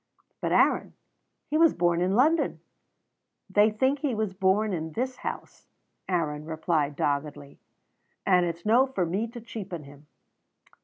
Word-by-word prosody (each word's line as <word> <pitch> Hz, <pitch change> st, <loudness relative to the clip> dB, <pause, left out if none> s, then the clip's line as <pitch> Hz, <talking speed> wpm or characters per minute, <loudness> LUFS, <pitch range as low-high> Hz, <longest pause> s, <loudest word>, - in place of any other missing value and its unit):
"But, -, -, -1 dB
Aaron, -, -, +2 dB, 0.6 s
he 310 Hz, -, +2 dB
was 330 Hz, -2 st, +5 dB
born 175 Hz, 0 st, +1 dB
in 185 Hz, +2 st, +1 dB
London!" 310 Hz, +8 st, +2 dB, 0.9 s
"They 205 Hz, +2 st, +4 dB
think 260 Hz, +6 st, +1 dB
he 270 Hz, -4 st, -1 dB
was 215 Hz, -3 st, -2 dB
born 195 Hz, +2 st, +1 dB
in 160 Hz, -2 st, -4 dB
this 255 Hz, -, -3 dB
house," -, -, -7 dB, 0.4 s
Aaron 155 Hz, -5 st, -1 dB
replied 155 Hz, -2 st, -1 dB
doggedly, 145 Hz, 0 st, -3 dB, 0.7 s
"and 180 Hz, -2 st, +4 dB
it's 170 Hz, 0 st, -6 dB
no 240 Hz, +5 st, +4 dB
for 200 Hz, -9 st, -1 dB
me 195 Hz, +7 st, -1 dB
to 240 Hz, +1 st, -9 dB
cheapen 195 Hz, -8 st, -7 dB
him." 145 Hz, +1 st, -15 dB
190 Hz, 145 wpm, -27 LUFS, 160-230 Hz, 0.9 s, was